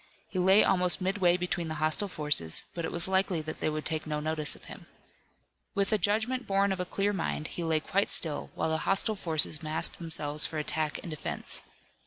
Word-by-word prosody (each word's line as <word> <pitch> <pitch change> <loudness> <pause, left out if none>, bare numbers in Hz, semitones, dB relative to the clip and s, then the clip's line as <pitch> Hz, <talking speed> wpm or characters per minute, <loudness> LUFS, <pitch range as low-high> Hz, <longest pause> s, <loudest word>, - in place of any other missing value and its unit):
He 185 - -3
lay 190 +3 +5
almost 180 -3 +2
midway 185 -2 +1
between 180 -1 -3
the 155 - -4
hostile 155 +6 0
forces, 150 - +2
but 170 -1 -4
it - - -4
was 170 +1 +1
likely 190 -2 +1
that 155 +1 -7
they - - 0
would 155 0 -4
take 155 -1 -2
no 150 -1 -2
notice 155 0 +5
of - - -15
him. - - -12 0.9
With 200 0 +1
a 215 - +2
judgment 220 +6 -1
born 195 0 +2
of 190 - -3
a 180 - -2
clear 200 +3 -1
mind, 165 -4 -3
he 175 - -5
lay 160 -1 0
quite 200 +5 0
still, 155 -3 0
while - - -1
the 160 - 0
hostile 195 +3 +3
forces 160 -5 +2
massed 155 0 -2
themselves 155 -3 -2
for 160 - -6
attack 155 0 -1
and 170 - -7
defense. 155 - -2
170 Hz, 210 wpm, -29 LUFS, 155-195 Hz, 0.9 s, lay